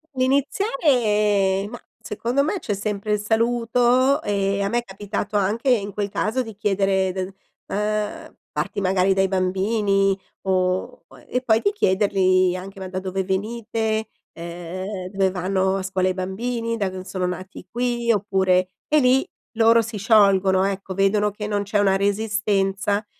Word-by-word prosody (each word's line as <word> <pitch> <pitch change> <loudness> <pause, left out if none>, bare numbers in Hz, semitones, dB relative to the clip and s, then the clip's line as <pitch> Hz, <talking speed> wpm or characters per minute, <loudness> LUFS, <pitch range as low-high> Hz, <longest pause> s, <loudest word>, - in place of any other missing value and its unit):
Iniziare, 240 - +2
ma, 240 - -8 0.2
secondo 240 +6 -1
me 355 +7 -1
c'è 210 - -3
sempre 205 +1 -2
il 210 - +1
saluto 240 +4 +2
e 200 -1 0
a 200 - +1
me 240 +3 +1
è - - -6
capitato 205 +1 -4
anche 215 +7 0
in 205 -5 +1
quel 205 -1 -2
caso 225 +6 -1
di 225 -4 -7
chiedere 195 -2 +1
del, 185 0 -3 0.4
uhm, 210 0 -3 0.2
parti 200 - -3
magari 190 0 +2
dai 195 0 +2
bambini 195 +1 +1 0.2
o 185 - -1 0.2
e 250 - -1
poi 225 -3 +2
di 405 - +2
chiedergli 185 - +2
anche: 195 +2 -8
"Ma 190 - -6
da 185 0 -3
dove 190 0 -3
venite?" 220 +2 -2 0.3
Uhm: 180 +3 -6
"Dove 195 -1 +1
vanno 190 +1 0
a 190 - -4
scuola 185 -1 0
i - - 0
bambini? 230 +5 -3
Da 200 -4 -1
dove 185 0 -8
sono 185 -2 -2
nati? 185 +1 -7
Qui, 240 -1 0
oppure" 190 -3 +2 0.2
e 305 0 +4
lì 255 0 +3 0.3
loro 230 0 +5
si 225 -1 -6
sciolgono, 195 -3 +4
ecco, 195 -1 -3
vedono 205 +2 +2
che 210 +1 -6
non 205 -1 -1
c'è 205 +1 -1
una 195 -1 +3
resistenza 205 0 0
200 Hz, 155 wpm, -22 LUFS, 190-225 Hz, 0.4 s, loro